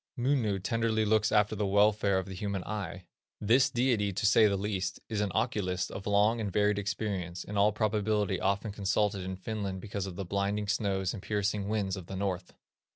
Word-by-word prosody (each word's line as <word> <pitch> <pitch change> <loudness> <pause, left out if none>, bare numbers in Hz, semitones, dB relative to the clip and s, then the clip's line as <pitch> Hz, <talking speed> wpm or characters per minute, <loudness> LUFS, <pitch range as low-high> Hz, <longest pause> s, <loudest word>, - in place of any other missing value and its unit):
Munu 120 -5 +1
tenderly 110 +2 0
looks 110 0 +2
after 105 0 +3
the 105 -1 -1
welfare 100 0 +3
of 95 - -1
the 95 - -8
human 100 0 -3
eye. 95 -4 -5 0.3
This 125 +6 +4
deity, 120 -6 +1
to 95 - -2
say 110 +1 +6
the 100 -1 0
least, 95 -1 -2
is 110 -2 -1
an 105 -2 -1
oculist 90 -2 -1
of 95 - -7
long 105 +3 +3
and 100 -2 -2
varied 105 +1 +2
experience, 100 -3 -3
in 105 - -7
all 100 +1 +4
probability 105 -2 0
often 100 +2 0
consulted 100 0 0
in 95 0 -4
Finland 100 -1 -4
because 100 0 -4
of 90 - -7
the 95 - -4
blinding 100 +2 -1
snows 95 -2 0
and 105 - -7
piercing 105 -1 -1
winds 100 -3 -1
of 95 -3 -8
the 95 - -6
north. 95 -2 -3
100 Hz, 195 wpm, -30 LUFS, 95-105 Hz, 0.3 s, say